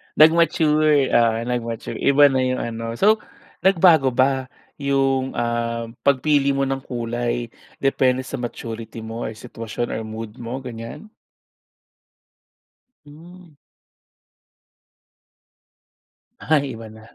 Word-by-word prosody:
Nag-mature 155 Hz, -3 st, +4 dB
oo, 115 Hz, -1 st, +4 dB
nag-mature 120 Hz, -2 st, -4 dB
iba 145 Hz, +1 st, +5 dB
na 130 Hz, -, +1 dB
yung 130 Hz, 0 st, 0 dB
ano. 115 Hz, 0 st, -4 dB
So 215 Hz, -, +4 dB, 0.4 s
nagbago 165 Hz, -7 st, +4 dB
ba 130 Hz, +1 st, +1 dB, 0.3 s
yung, 135 Hz, -1 st, 0 dB
um, 120 Hz, 0 st, -2 dB, 0.2 s
pagpili 140 Hz, 0 st, +3 dB
mo 135 Hz, -, -1 dB
ng 135 Hz, 0 st, -1 dB
kulay 120 Hz, -1 st, -3 dB, 0.3 s
depende 130 Hz, -2 st, +2 dB
sa 130 Hz, -, -6 dB
maturity 115 Hz, -2 st, -6 dB
mo 115 Hz, +1 st, -6 dB
or -, -, -4 dB
sitwasyon 115 Hz, +1 st, -6 dB
or 110 Hz, -, -3 dB
mood 110 Hz, +1 st, -7 dB
mo 120 Hz, +3 st, -6 dB
ganyan? 115 Hz, -, -8 dB, 2.0 s
Hmm. 165 Hz, +2 st, -15 dB, 2.8 s
Ay, 140 Hz, -5 st, 0 dB
wala. 110 Hz, -1 st, -11 dB
130 Hz, 100 wpm, -22 LUFS, 115-140 Hz, 2.8 s, iba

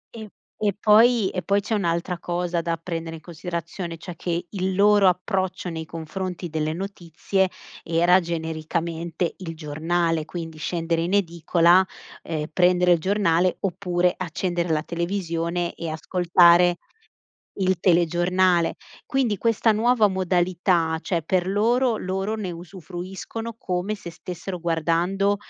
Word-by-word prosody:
E 220 Hz, -2 st, -8 dB, 0.3 s
e 205 Hz, -, +3 dB
poi 220 Hz, 0 st, +5 dB
e 185 Hz, -, -3 dB
poi 200 Hz, +2 st, +2 dB
c'è 220 Hz, -, -4 dB
un'altra 175 Hz, -2 st, -1 dB
cosa 175 Hz, -1 st, -2 dB
da 165 Hz, 0 st, -2 dB
prendere 165 Hz, -1 st, -5 dB
in 160 Hz, -, -11 dB
considerazione, 170 Hz, 0 st, -6 dB
cioè 170 Hz, +2 st, -8 dB
che 175 Hz, +1 st, -3 dB
il 190 Hz, -2 st, -2 dB
loro 205 Hz, -1 st, +5 dB
approccio 185 Hz, 0 st, -2 dB
nei 160 Hz, -1 st, -5 dB
confronti 175 Hz, +3 st, -5 dB
delle 155 Hz, 0 st, -1 dB
notizie, 190 Hz, 0 st, -2 dB, 0.3 s
era 175 Hz, +3 st, +4 dB
genericamente 165 Hz, +1 st, -3 dB
il 165 Hz, -3 st, -6 dB
giornale, 160 Hz, +1 st, -1 dB
quindi 165 Hz, -1 st, -7 dB
scendere 165 Hz, +1 st, -1 dB
in 175 Hz, +4 st, 0 dB
edicola, 170 Hz, 0 st, +3 dB, 0.4 s
ehm, 155 Hz, -2 st, -3 dB
prendere 180 Hz, 0 st, +4 dB
il 170 Hz, -, +1 dB
giornale, 185 Hz, -2 st, +2 dB
oppure 180 Hz, -2 st, 0 dB
accendere 175 Hz, -1 st, -2 dB
la 155 Hz, -1 st, +1 dB
televisione 170 Hz, -1 st, -2 dB
e 170 Hz, -, -5 dB
ascoltare 175 Hz, +1 st, +4 dB, 0.8 s
il 185 Hz, -1 st, +2 dB
telegiornale. 175 Hz, 0 st, +2 dB, 0.3 s
Quindi 255 Hz, -6 st, +1 dB
questa 230 Hz, +1 st, +2 dB
nuova 220 Hz, 0 st, +3 dB
modalità, 175 Hz, -3 st, +1 dB
cioè 170 Hz, -2 st, -1 dB
per 180 Hz, +2 st, 0 dB
loro 230 Hz, +4 st, +2 dB
loro 190 Hz, +3 st, -2 dB
ne 210 Hz, -4 st, -4 dB
usufruiscono, 185 Hz, +6 st, -7 dB
come 185 Hz, +1 st, -2 dB
se 175 Hz, -4 st, -9 dB
stessero 180 Hz, +2 st, -7 dB
guardando 170 Hz, +4 st, +1 dB
175 Hz, 130 wpm, -24 LUFS, 165-190 Hz, 0.8 s, poi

